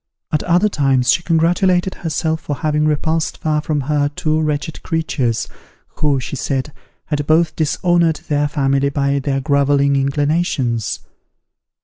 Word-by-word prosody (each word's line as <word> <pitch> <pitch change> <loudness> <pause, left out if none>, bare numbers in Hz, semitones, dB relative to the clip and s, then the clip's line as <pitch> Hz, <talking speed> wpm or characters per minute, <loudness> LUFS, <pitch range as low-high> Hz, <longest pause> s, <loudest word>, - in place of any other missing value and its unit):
At 155 - +1
other 180 +4 +3
times 135 -8 +2
she - - +2
congratulated 175 +3 +2
herself 160 0 -2
for 145 - -3
having 150 +1 0
repulsed 160 +1 0
far 150 -1 0
from 150 -1 -1
her 145 +1 0
two 155 +1 -1
wretched 150 0 -2
creatures, 135 -9 -1 0.5
who, 145 -3 +1
she 130 - -5
said, 135 +1 -2 0.3
had 145 -2 -2
both 160 +1 +3
dishonoured 165 +1 +1
their 145 0 +1
family 140 -1 +1
by 140 0 0
their 135 0 -1
grovelling 140 0 +2
inclinations. 140 - 0
150 Hz, 135 wpm, -18 LUFS, 140-160 Hz, 0.5 s, other